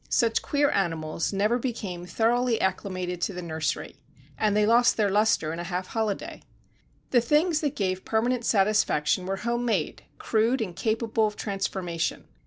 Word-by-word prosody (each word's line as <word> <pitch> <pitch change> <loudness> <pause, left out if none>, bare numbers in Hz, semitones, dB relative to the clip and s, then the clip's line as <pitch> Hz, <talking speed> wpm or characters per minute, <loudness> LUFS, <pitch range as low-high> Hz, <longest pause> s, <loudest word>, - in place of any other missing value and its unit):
Such 230 -2 +2
queer 285 0 +1
animals 165 -4 -1
never 210 +5 +1
became 200 -8 -4
thoroughly 235 +4 +1
acclimated 185 -2 -2
to 200 - -1
the 180 - -5
nursery, 160 -2 -3 0.4
and 210 -1 +1
they 210 - +4
lost 235 +3 +4
their 205 -3 +2
lustre 205 -6 +2
in 165 - -5
a - - -3
half 180 +1 -4
holiday. 220 -3 -3 0.7
The 245 - +5
things 300 +6 +2
that 290 -3 -1
gave 185 -2 -1
permanent 240 +2 0
satisfaction 195 -6 +2
were 195 0 -1
home 240 0 0
made, 210 -10 -1 0.2
crude 230 +4 +1
and 190 -6 -3
capable 220 +1 0
of 210 - -6
transformation. 190 -5 -3
210 Hz, 160 wpm, -26 LUFS, 185-235 Hz, 0.7 s, The